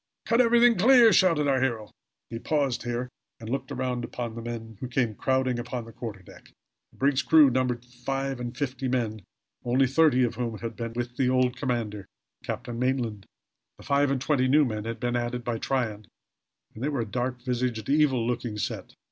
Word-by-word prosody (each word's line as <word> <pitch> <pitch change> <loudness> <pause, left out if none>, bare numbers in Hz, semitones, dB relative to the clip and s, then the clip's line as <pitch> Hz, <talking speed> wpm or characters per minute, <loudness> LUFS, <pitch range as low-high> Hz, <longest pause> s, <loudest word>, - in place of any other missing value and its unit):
Cut 230 +2 +4
everything 235 -2 +5
clear!" 235 +1 +7
shouted 165 -6 +4
our 135 -2 +2
hero. 115 -5 -1 0.4
He 115 - -4
paused 140 -2 0
here, 120 +1 -3 0.3
and 110 - -9
looked 135 +2 -3
around 125 -1 -2
upon 120 -1 -5
the 115 - -7
men 115 -2 -7
who 130 - -4
came 125 -3 0
crowding 130 +1 0
upon 120 0 -5
the 115 - -11
quarter 105 -4 -7
deck. - - -16 0.4
The - - -23
brig's 140 0 +2
crew 145 +1 +6
numbered 125 -1 -1
five 135 +2 -4
and 120 0 -6
fifty 130 -1 -2
men, 115 -4 -1 0.4
only 125 +3 +3
thirty 135 -1 +4
of 120 - 0
whom 115 -2 -3
had 115 0 -6
been 115 -1 -5
with 120 0 -4
the 130 -2 +2
old 130 -1 +2
commander, 115 -7 -3 0.4
Captain 120 -2 -5
Maitland. 125 -6 -1 0.5
The - - -14
five 140 0 +2
and 135 -1 0
twenty 130 -1 +1
new 145 +3 +5
men 110 -3 -4
had 115 0 -4
been 120 -1 -1
added 120 0 -2
by 115 -2 -2
Tryon, 110 -6 -2 0.7
and 110 - -8
they 145 - +1
were 140 -5 -1
a - - -2
dark 125 +2 -3
visaged, 120 -3 -2
evil 140 -4 +3
eyed - - -2
looking 120 -3 -3
set. - - -4
125 Hz, 200 wpm, -27 LUFS, 115-135 Hz, 0.7 s, clear